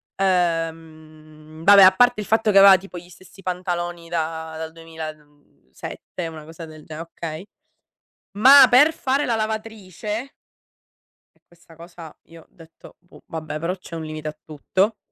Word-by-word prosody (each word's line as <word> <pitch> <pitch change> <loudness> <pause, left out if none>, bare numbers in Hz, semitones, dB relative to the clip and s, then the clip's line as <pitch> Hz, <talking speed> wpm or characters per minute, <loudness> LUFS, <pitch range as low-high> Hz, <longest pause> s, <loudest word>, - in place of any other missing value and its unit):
ehm, 160 -3 -3
vabbè, 200 +1 +8
a 185 - +8
parte 245 -2 +3
il - - -7
fatto 220 -1 +2
che 195 - +3
aveva 195 -1 +8
tipo 185 -1 -11
gli 175 +1 -12
stessi 185 +2 -17
pantaloni 175 -2 -4
da 160 -1 -4
dal 160 0 -6
duemila, 160 -1 -8
mhmm, 145 - -30
sette, 170 - -8
una 155 -2 -10
cosa 165 +1 -10
del 155 -1 -14
ge 155 - -9
okay, 165 +1 -8 0.9
ma 260 +7 +8
per 290 +6 +5
fare 275 -1 -1
la 230 -2 -1
lavatrice 215 +1 -5 1.0
e - - -35
questa 170 -1 -21
cosa, 165 -1 -13
io 165 -1 -17
detto: 165 -2 -18
"Boh 175 - -20
vabbè, 155 -1 -6
però 170 +3 -3
c'è 170 -2 -11
un 160 - -6
limite 155 0 -7
a 155 0 -7
tutto." 190 +8 -2
170 Hz, 160 wpm, -22 LUFS, 160-195 Hz, 1.0 s, vabbè